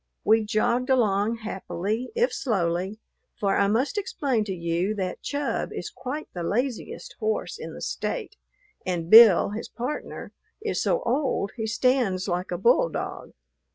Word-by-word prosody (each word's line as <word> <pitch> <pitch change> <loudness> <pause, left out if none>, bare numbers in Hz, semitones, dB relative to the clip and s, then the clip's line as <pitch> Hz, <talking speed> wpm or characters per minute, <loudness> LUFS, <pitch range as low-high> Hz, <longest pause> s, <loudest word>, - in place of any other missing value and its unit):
We 220 +1 +4
jogged 235 +4 0
along 225 -2 +2
happily, 210 +3 -3
if 480 +1 +2
slowly, 190 - -1 0.4
for 195 -1 +1
I 200 - +3
must 255 - +1
explain 270 - -1
to 200 - -4
you 175 +3 -1
that 185 -3 -3
Chub 285 0 -2
is - - -5
quite 285 +4 -5
the 175 - -5
laziest 250 - -2
horse 440 0 -2
in - - -7
the - - -8
State, 415 - -3 0.5
and 175 -2 -3
Bill, 220 -6 +9
his 215 +2 -5
partner, 250 +5 -5 0.3
is 430 -1 -2
so - - +1
old 265 - 0
he 220 -2 -3
stands 230 -5 +1
like 180 0 -2
a 175 - -2
bulldog. 245 - +1
220 Hz, 150 wpm, -26 LUFS, 190-260 Hz, 0.5 s, Bill